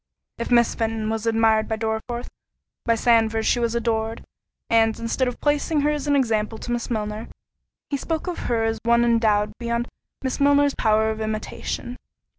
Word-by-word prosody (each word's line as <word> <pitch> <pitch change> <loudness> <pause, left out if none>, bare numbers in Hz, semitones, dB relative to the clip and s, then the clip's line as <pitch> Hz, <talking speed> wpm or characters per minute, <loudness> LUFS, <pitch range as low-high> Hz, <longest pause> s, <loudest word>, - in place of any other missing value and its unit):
If 235 - -3
Miss 235 -1 +4
Fenton 225 -1 -2
was 225 0 -2
admired 225 -1 +3
by 220 - -1
Dorriforth, 225 +2 -3 0.6
by 230 - +3
Sandford 225 -1 +2
she 245 - +2
was 235 -1 0
adored—and, 225 0 -1
instead 230 +3 0
of 245 - -4
placing 295 +1 +1
her 295 +1 +2
as 295 -1 -3
an 285 - +3
example 225 -4 +1
to 240 - -6
Miss 240 -1 -2
Milner, 215 -1 -3 0.6
he 280 - +1
spoke 320 +3 -3
of 360 -2 -4
her 230 -2 +1
as 225 0 0
of - - -15
one 235 0 +5
endowed 220 -3 +2
beyond 235 0 -1 0.4
Miss 260 +2 -2
Milner's 285 0 +4
power 220 0 +2
of 220 0 -5
imitation. 220 +3 -4
230 Hz, 175 wpm, -23 LUFS, 220-245 Hz, 0.6 s, one